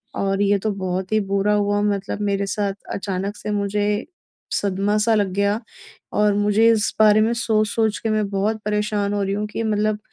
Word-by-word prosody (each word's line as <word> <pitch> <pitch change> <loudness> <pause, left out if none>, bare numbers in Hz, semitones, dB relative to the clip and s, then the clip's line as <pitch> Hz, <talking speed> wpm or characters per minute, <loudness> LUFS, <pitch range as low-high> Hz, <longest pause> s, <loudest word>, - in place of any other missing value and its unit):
और 195 0 0
ये 205 0 +3
तो 215 +2 -1
बहुत 185 0 -3
ही 215 - +3
बुरा 200 +1 +2
हुआ 205 0 +1
मतलब 205 0 -1
मेरे 200 -1 0
साथ 200 0 -1 0.2
अचानक 195 +1 -3
से 210 - -5
मुझे 205 0 0 0.7
सदमा-सा 205 +3 +1
लग 205 -2 +2
गया 200 +2 +1 0.5
और 210 0 +3
मुझे 210 +2 +3
इस 220 -1 +1
बारे 215 0 +6
में 235 - 0
सोच-सोच 220 -1 +1
के 225 - -2
मैं 215 -1 +1
बहुत 205 +3 -1
परेशान 210 -1 0
हो 205 - 0
रही 195 0 -1
हूँ 210 +1 -2
कि 225 - -3
मतलब 215 -1 0
205 Hz, 185 wpm, -21 LUFS, 200-215 Hz, 0.7 s, बारे